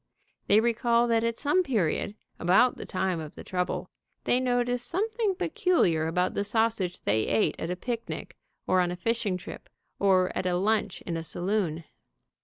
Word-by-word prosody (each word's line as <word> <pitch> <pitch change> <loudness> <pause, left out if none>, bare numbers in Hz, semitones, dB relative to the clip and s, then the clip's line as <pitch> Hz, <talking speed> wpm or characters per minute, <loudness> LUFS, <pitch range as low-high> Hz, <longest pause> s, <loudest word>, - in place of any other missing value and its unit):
They 205 - +6
recall 235 +1 +2
that 230 -1 +2
at 230 0 -1
some 300 +6 +2
period, 210 - 0 0.2
about 195 +9 +4
the - - -8
time 185 -2 -1
of 155 -2 -8
the - - -9
trouble, 180 -1 -3 0.3
they 245 - +2
noticed 245 -1 0
something 430 +2 0
peculiar 355 - +1
about 180 +2 0
the 200 - -1
sausage 210 -4 0
they 110 +1 +1
ate 215 - +2
at 165 - -3
a 180 - -1
picnic, 230 +4 -5 0.3
or 185 0 +3
on 175 - +1
a 175 - -3
fishing 215 0 -1
trip, 180 - -10 0.3
or 185 -2 +3
at 185 - -1
a 180 - +1
lunch 210 0 0
in 170 -2 -4
a - - -3
saloon. 175 -1 -1
210 Hz, 175 wpm, -28 LUFS, 180-240 Hz, 0.3 s, They